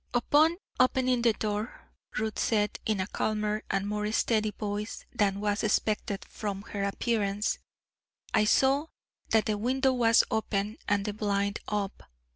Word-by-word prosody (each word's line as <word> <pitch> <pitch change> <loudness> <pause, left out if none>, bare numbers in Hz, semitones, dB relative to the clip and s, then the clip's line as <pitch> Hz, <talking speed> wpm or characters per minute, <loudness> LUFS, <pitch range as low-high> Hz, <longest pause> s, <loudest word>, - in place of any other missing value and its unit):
"Upon 305 +7 +4 0.2
opening 255 -1 +3
the 235 -1 +4
door," 210 +2 -4 0.3
Ruth 220 0 -2
said, 210 -2 +1
in 215 -3 +1
a 185 - 0
calmer 210 +1 -1
and 195 +1 0
more 210 0 -1
steady 215 -1 +2
voice 210 0 -4
than 200 -1 +1
was 205 0 0
expected 210 -2 0
from 200 -2 -5
her 205 -1 -5
appearance, 205 0 0 0.7
"I 220 -2 +4
saw 270 +7 +3 0.4
that 220 -1 +3
the 210 -1 -1
window 260 +3 +2
was 230 -3 +5
open 215 -1 -1
and 200 -1 +1
the 210 - -2
blind 200 -1 -1
up. 205 -2 -2
210 Hz, 145 wpm, -29 LUFS, 205-230 Hz, 0.7 s, was